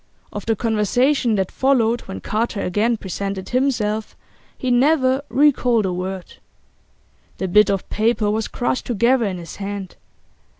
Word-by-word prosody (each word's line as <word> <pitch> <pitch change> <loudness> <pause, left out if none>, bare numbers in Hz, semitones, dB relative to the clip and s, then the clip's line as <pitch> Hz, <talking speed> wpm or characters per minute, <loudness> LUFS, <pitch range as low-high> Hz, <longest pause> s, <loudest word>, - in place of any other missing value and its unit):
Of 205 0 -6
the 225 - +2
conversation 230 +3 +1
that 190 -2 -1
followed 240 -3 +2
when 95 - -8
Carter 220 -1 -2
again 215 +6 +1
presented 195 -1 -5
himself 230 -5 -1 0.4
he 255 - -2
never 260 +1 +3
recalled 250 -6 +3
a 185 - -1
word. 185 0 -5 1.0
The 190 - -2
bit 210 +3 +5
of 195 -1 -1
paper 220 -1 +1
was 220 0 -1
crushed 245 0 -2
together 240 +1 +2
in 190 -3 -2
his 170 -2 -9
hand. 200 -2 -6
220 Hz, 140 wpm, -21 LUFS, 195-245 Hz, 1.0 s, bit